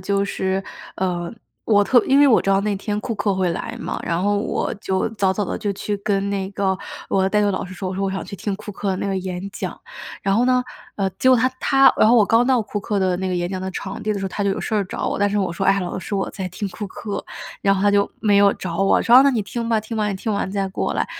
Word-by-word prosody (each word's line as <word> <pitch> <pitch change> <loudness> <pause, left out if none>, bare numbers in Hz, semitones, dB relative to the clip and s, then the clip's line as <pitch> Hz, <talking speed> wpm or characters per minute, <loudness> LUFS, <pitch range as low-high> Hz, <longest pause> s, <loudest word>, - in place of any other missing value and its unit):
就 200 +1 0
是， 190 -1 -1 0.4
呃， 175 -2 -2 0.3
我 205 -2 +4
特 245 0 +4
因 270 - +4
为 290 - +7
我 240 - +5
知 195 - 0
道 195 0 +4
那 205 0 -1
天 205 +1 -3
库 230 - -3
克 205 0 0
会 190 -2 0
来 225 +7 -5
嘛， - - -4
然 170 +1 -1
后 205 +1 +1
我 210 - -2
就 190 -2 0
早 200 -3 +1
早 205 +2 -1
地 - - -3
就 205 - -2
去 205 +1 -3
跟 200 -1 -1
那 195 -1 -2
个 195 -1 0 0.3
我 190 - +2
的 190 - +1
代 210 +1 +3
课 205 -1 +2
老 - - -2
师 180 - -9
说， 185 +1 -5
我 185 - -4
说： 195 - -2
“我 195 - 0
想 190 0 -4
去 - - -8
听 205 +1 -3
库 210 0 -8
克 200 - -4
的 190 - 0
那 195 - -3
个 195 - -1
演 185 +1 -4
讲。” - - -5 0.4
然 195 0 +1
后 235 - +3
呢 250 0 +2 0.3
呃， 195 -2 0
结 260 - +3
果 255 - +7
他 255 +3 +3
他 270 0 +5
然 215 - +5
后 240 - +6
我 220 - +6
刚 225 +4 +3
到 255 -2 +3
库 205 - -4
克 205 0 -1
的 185 -1 +1
那 190 +1 -2
个 185 - -1
演 175 0 -1
讲 185 -1 -4
的 190 0 -4
场 - - -6
地 215 - 0
的 200 - -3
时 195 - -4
候， - - -1
他 205 - -3
就 200 - +1
有 195 - -2
事 - - -3
儿 205 -2 +1
找 - - -4
我， - - -2
但 205 - +3
是 205 - 0
我 190 -4 0
说： 185 +3 -3
“哎 - - +6
呀， 195 - 0
老 175 -2 -4
师 200 +2 -4
我 195 - -1
在 190 -2 -5
听 200 +3 -4
库 205 +2 -7
克。” 205 +2 -5 0.4
然 195 0 +4
后 190 - -2
他 205 +1 +4
就 200 0 +2
没 205 -2 +4
有 200 0 +5
找 170 -2 -5
我， 195 - +4
说： 235 - +4
“啊， 260 - +9
那 280 - +5
你 235 -5 0
听 230 +4 -4
吧， 225 -2 +2
听 220 +1 -6
完 210 -1 0
你 - - -4
听 215 +3 -3
完 200 -1 -2
再 195 0 -1
过 190 - -2
来。” - - 0
200 Hz, 330 characters per minute, -21 LUFS, 190-215 Hz, 0.4 s, 啊